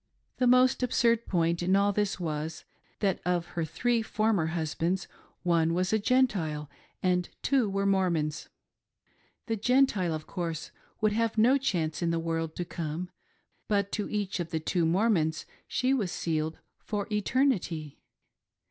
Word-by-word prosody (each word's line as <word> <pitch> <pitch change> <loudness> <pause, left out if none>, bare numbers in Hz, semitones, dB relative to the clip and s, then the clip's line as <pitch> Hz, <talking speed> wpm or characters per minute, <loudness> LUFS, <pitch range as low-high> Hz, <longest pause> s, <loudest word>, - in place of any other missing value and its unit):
The 250 - +2
most 255 +1 +5
absurd 235 -2 +2
point 170 -1 +1
in 185 +2 +2
all 200 +1 +3
this 205 -2 0
was, 155 -2 -4 0.4
that 195 -3 +1
of 175 -1 0
her 170 - -1
three 235 +9 0
former 215 -6 +1
husbands, 165 +3 -1 0.4
one 165 -2 +2
was 185 +3 0
a 220 - +3
Gentile, 195 - +1 0.3
and 180 -1 +1
two 260 -6 +2
were 195 0 -1
Mormons. 170 -6 0 1.0
The 225 - -1
Gentile, 220 -6 +3
of 155 - -7
course, 165 -4 -4 0.3
would 215 -1 +3
have 230 +1 0
no 250 +6 +5
chance 165 -11 -1
in 170 - +1
the 165 - +1
world 165 -1 -2
to 175 - -3
come, 170 +1 -4 0.6
but 200 -1 +1
to 210 - -2
each 205 -3 -2
of 170 -1 -3
the 160 - -1
two 165 +1 0
Mormons 165 -4 +1 0.2
she 255 +1 +1
was 210 -10 0
sealed 160 -1 -2 0.2
for 205 -2 -3
eternity. 210 - 0
185 Hz, 150 wpm, -29 LUFS, 165-220 Hz, 1.0 s, most